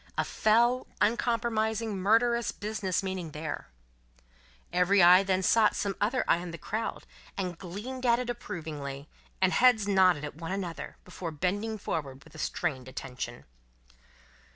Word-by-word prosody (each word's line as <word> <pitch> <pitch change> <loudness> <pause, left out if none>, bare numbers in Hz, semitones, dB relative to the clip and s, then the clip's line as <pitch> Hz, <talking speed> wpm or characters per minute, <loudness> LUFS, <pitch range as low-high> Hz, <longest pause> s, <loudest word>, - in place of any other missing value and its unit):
A - - +2
fell, 235 +4 +2
uncompromising, 220 -1 0
murderous 230 +4 +2
business 205 -3 -2
meaning 185 -5 -4
there. 155 +1 -5 1.1
Every 180 +3 +4
eye 180 +2 +8
then 190 -1 0
sought 220 +2 +4
some 200 -2 -1
other 235 +5 +1
eye - - +4
in 175 0 -6
the 170 - -7
crowd, 220 +7 -4 0.3
and 180 -3 -2
gleamed 210 +10 -7
at 235 0 +5
it 250 0 -3
approvingly; 150 - -6 0.4
and 190 - +4
heads 240 -5 +4
nodded 185 -6 +4
at 150 - -6
one 165 +1 -5
another, 185 -4 -5
before 180 -1 -6
bending 200 +8 -2
forward 140 -9 -4
with - - -18
a 160 - -11
strained 140 -6 -2
attention. 125 -2 -6
190 Hz, 145 wpm, -29 LUFS, 165-220 Hz, 1.1 s, eye